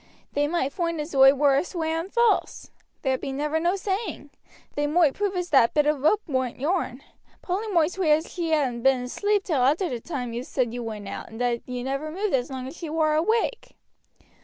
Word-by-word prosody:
They 290 +1 +1
might 290 -4 -1
foind 335 -2 -2
as 300 +2 -5
oi 270 0 +8
war 285 0 +4
a 280 - +2
swearing 330 0 -3
false. 470 +2 +1 0.3
There 265 -2 +1
be - - -4
never 300 +3 -1
no 345 +3 +1
saying. 390 -6 -4 0.4
They 290 0 0
moight 310 -2 +3
prove 405 -1 -2
as 360 -1 -3
that 265 -4 +4
bit 300 -1 +4
of 300 -2 +1
rope 415 +9 +3
warn't 260 -5 -2
yourn. 290 -3 -1 0.4
Polly 385 +5 -2
moight 340 -5 +2
swear 345 -5 +3
as 315 +2 -5
she 340 -2 -2
hadn't 270 -7 +1
been 265 0 +3
asleep 405 +11 0
till 310 -9 0
arter 310 +8 +2
the 245 -3 -3
time 250 -4 -5
you 235 - -3
said 250 -3 -1
you 245 - -4
went 215 -3 -6
out, - - -7
and 225 - -10
that 245 -1 0
you 250 -1 -4
never 275 +4 -3
moved 385 +5 -2
as 250 -2 +1
long 260 -1 -5
as 270 - -9
she 330 - -6
war 310 -1 +1
awake. 445 +9 0
300 Hz, 215 wpm, -25 LUFS, 265-350 Hz, 0.4 s, oi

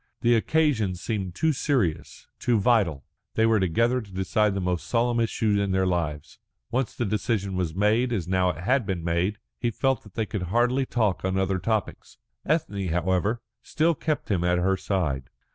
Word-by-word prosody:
The 120 - +4
occasion 115 -6 +1
seemed 95 -1 -4
too 160 +7 +2
serious, 125 - -1
too 120 -3 +2
vital. 95 - +2 0.3
They 110 - +3
were 115 -1 +4
together 115 +8 +2
to 100 -3 -13
decide 95 +2 +1
the - - -1
most 90 -2 -2
solemn 120 0 +1
issue 110 -2 +1
in 100 - -1
their 95 0 +2
lives. 75 -5 -2 0.3
Once 125 0 -1
the 120 - -1
decision 100 -1 -1
was 90 -3 -2
made, 110 +5 +2
as 95 -8 -2
now 90 0 +2
it 90 -1 -5
had 130 +6 +2
been 90 -4 -2
made, 85 +5 0 0.2
he 120 - 0
felt 135 +3 0
that 105 - -17
they 110 - 0
could 105 -1 -4
hardly 125 +5 +2
talk 105 -9 0
on 95 0 0
other 95 0 0
topics. 105 +3 -3 0.3
Ethne, 120 - 0
however, 95 +6 0 0.2
still 165 +2 +1
kept 155 -5 -2
him 90 -3 +1
at 90 0 +2
her 95 +2 +2
side. 75 -10 -2
100 Hz, 185 wpm, -26 LUFS, 90-120 Hz, 0.3 s, The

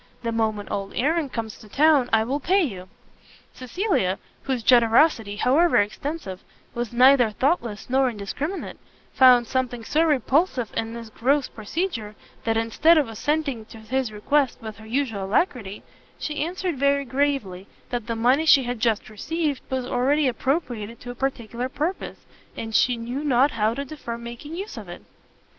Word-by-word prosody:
The 230 - -1
moment 220 -3 -1
old 195 0 -3
Aaron 305 +3 +1
comes 225 -3 -5
to 215 - -15
town, 290 -1 +4
I 220 0 +4
will 270 +6 -2
pay 375 +7 +2
you." 190 - -5 0.6
Cecilia, 255 - -1 0.2
whose 260 -4 -2
generosity, 230 -2 +4
however 310 +10 +3
extensive, 205 - -2 0.3
was 240 -1 -3
neither 250 0 +6
thoughtless 235 - -1
nor 265 +1 +2
indiscriminate, 245 - -5 0.3
found 250 -2 +6
something 245 -1 -2
so 310 +8 +2
repulsive 280 - +1
in 225 +1 -3
this 230 -2 -8
gross 270 +5 +1
procedure, 225 - -4 0.3
that 225 -1 +1
instead 230 +9 +4
of 295 -5 +2
assenting 275 +1 -2
to 225 - -13
his 245 +2 -2
request 265 +6 +1
with 220 -2 -8
her 220 +1 -13
usual 225 -5 -1
alacrity, 205 - -1 0.3
she 300 -1 -3
answered 350 -3 -3
very 280 0 +2
gravely 260 -9 -1 0.2
that 240 -2 -3
the 230 - -2
money 255 +8 +2
she 275 -3 +7
had 245 -1 -4
just 225 -2 0
received 295 +6 -3
was 260 -1 -2
already 270 +4 +1
appropriated 240 -4 -2
to 245 - -7
a - - -7
particular 245 -1 -3
purpose, 320 +8 -3 0.4
and 225 0 -5
she 245 +2 +3
knew 245 +5 -4
not 275 0 +3
how 220 0 0
to 280 - -4
defer 265 -5 -6
making 235 +7 -8
use 395 +4 -6
of - - -8
it. - - -9
250 Hz, 160 wpm, -24 LUFS, 225-285 Hz, 0.6 s, she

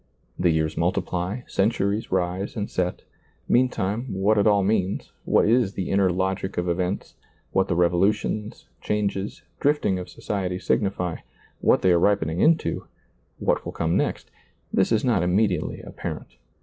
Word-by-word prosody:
The 90 - +3
years 80 -1 0
multiply, 90 +4 -1
centuries 100 +1 0
rise 95 +1 -1
and 105 -3 -2
set; 90 -1 -2 0.4
meantime, 120 -1 +1
what 100 +3 +2
it 100 - +3
all 100 -2 +4
means, 95 -1 0
what - - +3
is 115 -3 +3
the 95 -3 -3
inner 95 -1 +3
logic 95 +1 -2
of 90 0 0
events, 90 +2 -2 0.4
what 95 - +2
the 90 - 0
revolutions, 95 +5 0
changes, 100 -1 -2 0.2
drifting 145 -10 +2
of 90 - -7
society 95 -3 -3
signify 95 -4 0 0.2
— - - -31
what - - +3
they 95 - +5
are 85 - +4
ripening 85 -4 +1
into; 160 +6 +2 0.5
what - - 0
will - - -6
come 85 0 0
next; - - -1 0.4
this - - +2
is 110 +2 +2
not 115 -8 +3
immediately 90 -1 +1
apparent. - - -6
95 Hz, 150 wpm, -24 LUFS, 90-105 Hz, 0.5 s, they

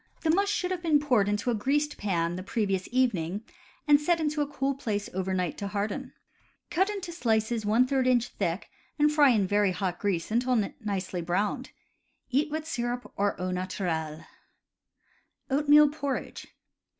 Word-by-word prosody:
The 320 - +2
mush 400 +4 +2
should 365 -3 -1
have 365 -2 -2
been 315 -4 +3
poured 245 -9 +2
into 205 +4 0
a - - +1
greased 290 +7 0
pan 175 -4 0
the 185 - -5
previous 195 -2 -1
evening, 210 -7 0 0.4
and 295 0 +6
set 335 +2 +2
in 305 -2 0
a 295 -1 0
cool 275 -1 -1
place 210 -6 -3
over 190 +1 -2
night 180 -4 -1
to 200 - -3
harden. 210 +6 -3 0.6
Cut 380 +3 +2
into 390 -4 -4
slices 225 -7 0
J 255 +4 +3
inch 240 -1 +2
thick, 170 +4 -3 0.3
and 300 0 +4
fry 295 -2 +5
in 215 -6 +3
very 205 +1 +2
hot 180 -2 -2
grease 195 -3 -1
until 250 +2 +2 0.2
nicely 190 -4 -3
browned. 175 +5 -1 0.6
Eat 290 +5 +2
with 310 +1 -4
syrup, 245 -3 -3
or 200 -2 0
au 185 0 -2
naturel. 170 -4 -3 1.3
Oatmeal 295 +1 +6
Porridge. 285 -2 -4
235 Hz, 160 wpm, -28 LUFS, 195-290 Hz, 1.3 s, and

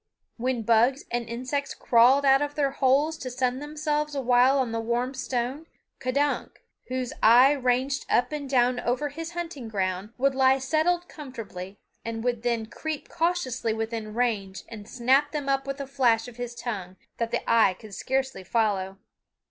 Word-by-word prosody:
When 245 -1 -1
bugs 235 +5 +3
and 240 -1 -2
insects 255 +4 -3
crawled 255 +4 +4
out 270 0 +5
of 290 0 -2
their 280 -2 +1
holes 280 +4 +2
to 255 - -5
sun 255 0 -1
themselves 300 0 -2
awhile 255 0 +4
on 250 -4 0
a 230 - -1
warm 240 +3 -1
stone, 260 +4 -3 0.3
K'dunk, 280 +3 -1 0.2
whose 255 -1 -3
eye 245 +5 +7
ranged 260 0 0
up 245 - +2
and 290 -2 -4
down 250 -1 +3
over 255 +5 -1
his 330 +3 -7
hunting 330 -8 -5
ground, 195 0 -2
would 275 +2 +2
lie 265 0 +4
settled 320 +6 0
comfortably, 215 - -8 0.3
and 225 0 -4
would 240 -2 -1
then 235 -2 0
creep 310 +6 -6
cautiously 320 -10 -1
within 220 -1 -4
range 210 -6 -1
and 215 -2 -10
snap 265 +4 +2
them 295 -3 -4
up 275 0 0
with 275 +1 -4
a 280 - -3
flash 250 -4 +2
of 245 -1 -12
his 245 -1 -5
tongue 210 -7 -5 0.2
that 230 -1 -1
the 240 - -2
eye 220 -5 +4
could 215 +1 -13
scarcely 265 -3 -2
follow. 195 -3 0
255 Hz, 170 wpm, -26 LUFS, 230-275 Hz, 0.3 s, eye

